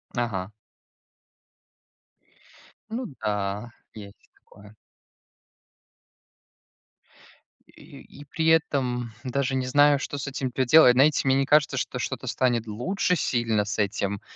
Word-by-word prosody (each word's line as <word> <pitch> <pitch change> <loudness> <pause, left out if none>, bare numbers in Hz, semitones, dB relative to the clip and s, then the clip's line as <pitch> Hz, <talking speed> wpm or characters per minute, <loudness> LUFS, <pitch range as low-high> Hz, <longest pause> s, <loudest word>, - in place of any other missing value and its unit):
Ага. 105 -5 -3 2.4
Ну 240 +3 -4
да, 105 +1 -3 0.2
есть 100 -2 -13
такое. 105 +1 -19 2.9
И - - -15 0.2
и - - -12
при 160 +3 -2
этом 130 -7 +1
даже 135 +1 -1
не 130 -1 -1
знаю, 145 +2 +4
что 145 - -5
с 140 - -5
этим 135 -1 -4
поделать. 130 +1 +5
Знаете, 140 +4 +3
мне 130 - +4
не 135 0 +1
кажется, 150 +1 +3
что - - -3
что-то - - -4
станет 120 -3 0
лучше 180 - -1
сильно 115 -7 0
с 105 +1 -4
этим, 100 -1 -2
125 Hz, 115 wpm, -25 LUFS, 105-145 Hz, 2.9 s, поделать